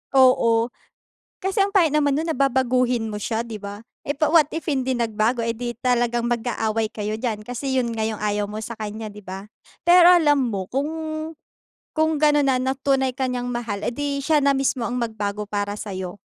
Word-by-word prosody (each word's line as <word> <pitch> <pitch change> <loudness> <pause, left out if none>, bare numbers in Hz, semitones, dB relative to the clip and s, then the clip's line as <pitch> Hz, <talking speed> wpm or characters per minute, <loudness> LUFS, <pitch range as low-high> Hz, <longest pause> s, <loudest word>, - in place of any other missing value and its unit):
Oo. 235 -2 +4 0.7
Kasi 385 +2 -1
ang 400 - -1
pangit 335 -6 +5
naman 285 -2 +3
no'n 320 +2 -1
na - - -3
babaguhin 250 -3 +1
mo - - -5
siya, 225 +2 -2
di 230 -2 -7
ba? 200 0 -7 0.3
Eh, 285 - -1
pa 305 +1 +1
what 320 -4 +6
if 325 - -3
hindi 260 -1 0
nagbago? 230 0 0
Eh 230 - 0
di 240 +1 -5
talagang 240 -1 +1
mag-aaway 225 -2 -1
kayo 215 0 -4
diyan 220 -3 -3
kasi 255 +3 -3
yun 240 -2 0
nga 220 -1 -1
yung 220 -1 -4
ayaw 205 -1 -1
mo 210 +1 -6
sa 235 - -5
kanya, 215 0 -5
di 210 - -11
ba? 190 +1 -7 0.4
Pero 350 0 +7
alam 295 -5 +5
mo 195 -4 -3
kung 275 +3 0 1.1
kung 315 0 +2
gano'n 295 -1 +4
na 255 -1 +2
na 265 +1 0
tunay 265 -1 +1
ka 260 -1 -1
niyang 245 -1 -3
mahal, 230 -4 -4
edi 280 +3 -2
siya 305 +1 +3
na 280 - +4
mismo 270 -2 0
ang 245 - -3
magbago 210 -3 -3
para 205 0 -2
sa'yo. 190 -3 -6
240 Hz, 200 wpm, -23 LUFS, 220-275 Hz, 1.1 s, Pero